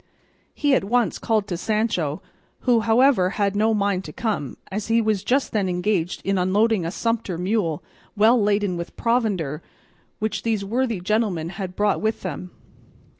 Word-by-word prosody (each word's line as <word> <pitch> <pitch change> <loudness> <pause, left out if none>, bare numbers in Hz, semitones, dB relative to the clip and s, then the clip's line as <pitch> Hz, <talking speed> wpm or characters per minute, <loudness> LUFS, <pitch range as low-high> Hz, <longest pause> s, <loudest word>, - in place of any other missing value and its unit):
He 290 -2 +2
at 260 - +3
once 235 +3 +1
called 215 -3 0
to 175 - -2
Sancho, 190 -6 -1 0.4
who, 245 -2 +3
however, 225 -3 +4
had 200 -1 +1
no 215 +2 +3
mind 200 -3 0
to 150 - -7
come, 200 - -3
as 205 +2 -3
he 225 +1 +3
was 215 -3 0
just 265 +5 +1
then 200 -4 0
engaged 180 -1 -1
in 195 -1 +1
unloading 205 +2 +2
a - - -1
sumpter 225 -2 -2
mule, 180 -4 -1 0.3
well 225 +3 +5
laden 205 -3 +1
with 170 0 -7
provender, 200 - 0 0.6
which 220 0 -2
these 220 -3 -1
worthy 230 0 -1
gentlemen 190 -5 0
had 185 -1 -6
brought 205 -1 +1
with 220 +1 -1
them. 180 0 -5
205 Hz, 165 wpm, -23 LUFS, 185-225 Hz, 0.6 s, well